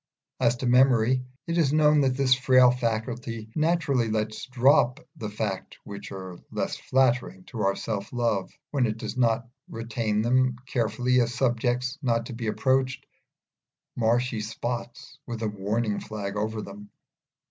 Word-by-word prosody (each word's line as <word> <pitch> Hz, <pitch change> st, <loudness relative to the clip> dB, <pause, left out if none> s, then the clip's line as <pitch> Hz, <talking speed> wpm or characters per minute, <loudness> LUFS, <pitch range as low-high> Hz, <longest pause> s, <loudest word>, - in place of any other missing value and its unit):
As 120 Hz, -, +3 dB
to 125 Hz, -, -5 dB
memory, 125 Hz, 0 st, +4 dB, 0.2 s
it 170 Hz, +1 st, 0 dB
is 145 Hz, -5 st, +3 dB
known 150 Hz, 0 st, +5 dB
that 130 Hz, -2 st, +1 dB
this 135 Hz, -2 st, +4 dB
frail 130 Hz, -1 st, +5 dB
faculty 115 Hz, -1 st, -3 dB
naturally 155 Hz, -7 st, +1 dB
lets 110 Hz, 0 st, -2 dB
drop 130 Hz, +1 st, +3 dB, 0.2 s
the 110 Hz, -, -5 dB
facts 105 Hz, -2 st, -4 dB
which 100 Hz, 0 st, -8 dB
are 95 Hz, -2 st, -7 dB
less -, -, -2 dB
flattering 125 Hz, -7 st, +1 dB
to 115 Hz, +3 st, -6 dB
our 100 Hz, 0 st, +2 dB
self 105 Hz, -3 st, -4 dB
love 115 Hz, -6 st, 0 dB, 0.2 s
when 130 Hz, -4 st, +2 dB
it 110 Hz, 0 st, -3 dB
does -, -, -5 dB
not 115 Hz, -2 st, +1 dB, 0.2 s
retain 115 Hz, -2 st, -1 dB
them 130 Hz, +1 st, +2 dB
carefully 125 Hz, 0 st, +1 dB
as 120 Hz, +1 st, -1 dB
subjects 125 Hz, +2 st, 0 dB
not 115 Hz, -4 st, +1 dB
to 120 Hz, -, -7 dB
be 115 Hz, -1 st, -4 dB
approached, 130 Hz, +3 st, +1 dB, 0.9 s
marshy 120 Hz, 0 st, +1 dB
spots 120 Hz, +4 st, -5 dB
with 115 Hz, -2 st, -4 dB
a -, -, +1 dB
warning 105 Hz, +1 st, -1 dB
flag 105 Hz, -2 st, -5 dB
over 110 Hz, +1 st, -2 dB
them. 205 Hz, 0 st, -10 dB
120 Hz, 150 wpm, -26 LUFS, 110-130 Hz, 0.9 s, known